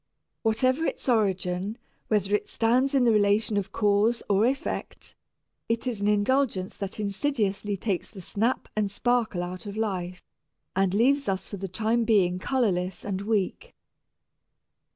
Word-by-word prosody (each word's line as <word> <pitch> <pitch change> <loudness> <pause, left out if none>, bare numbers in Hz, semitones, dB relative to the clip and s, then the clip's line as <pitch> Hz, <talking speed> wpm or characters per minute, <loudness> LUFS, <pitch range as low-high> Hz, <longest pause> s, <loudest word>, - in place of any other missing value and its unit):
Whatever 255 +7 +2
its - - -4
origin, 195 -3 0 0.3
whether 205 -2 +1
it 210 - +1
stands 255 +5 +2
in 265 - +4
the 235 - +5
relation 210 +1 +3
of 200 -1 -1
cause 210 +3 +2
or 205 +3 +3
effect, 270 +2 -4 0.6
it 230 +2 0
is 235 -5 -2
an 205 - +1
indulgence 210 -1 +1
that 200 +1 -5
insidiously 205 -2 -1
takes 190 -2 -2
the 200 - -11
snap 220 +7 -1
and 210 -2 +1
sparkle 225 -3 0
out 185 +3 -6
of 200 +1 -6
life 185 -5 -3 0.5
and 190 0 +2
leaves 270 +3 +3
us 190 -1 -2
for 200 - -6
the 195 +1 -4
time 220 +5 0
being 190 -5 +3
colorless 190 -7 -1
and 195 -2 -2
weak. 205 -2 -2
210 Hz, 150 wpm, -27 LUFS, 195-230 Hz, 0.6 s, the